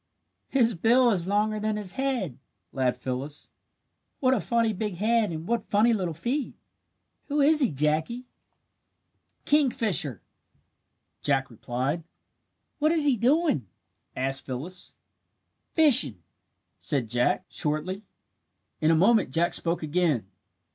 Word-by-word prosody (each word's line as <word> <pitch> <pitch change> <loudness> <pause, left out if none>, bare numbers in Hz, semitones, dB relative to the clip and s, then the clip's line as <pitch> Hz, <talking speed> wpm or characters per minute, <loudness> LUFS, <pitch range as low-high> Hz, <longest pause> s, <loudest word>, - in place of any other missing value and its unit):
"His 235 -4 +2
bill 235 +6 +3
is 180 -4 -1
longer 210 +2 0
than 215 0 -2
his 195 -4 -2
head!" 240 - -2 0.3
laughed 130 -2 -1
Phyllis. 130 +4 -5 0.7
"What 260 -1 +3
a 255 - +1
funny 230 -2 0
big 210 -1 -4
head 220 +3 +1
and 160 0 -6
what 235 0 -1
funny 220 +3 +2
little 180 -6 -2
feet! 250 - -3 0.7
Who 295 0 -1
is 300 +2 +4
he, 265 -6 +2
Jackie?" 155 - -1
"A - - -48
kingfisher!" 230 - +1 1.0
Jack 135 -3 0
replied. 130 +8 -3 0.8
"What 305 +1 +2
is 320 -3 +1
he 280 -3 +3
doing?" 250 - +1 0.5
asked 135 +1 -1
Phyllis. 150 +8 -6 0.8
"Fishing," 170 - +6 0.6
said 135 -5 -1
Jack, 120 +2 0
shortly. 175 +7 -3 0.7
In 155 - +2
a 165 - +4
moment 210 - +3
Jack 165 +6 0
spoke 170 -1 0
again. 155 - 0
190 Hz, 125 wpm, -26 LUFS, 145-235 Hz, 1.0 s, Fishing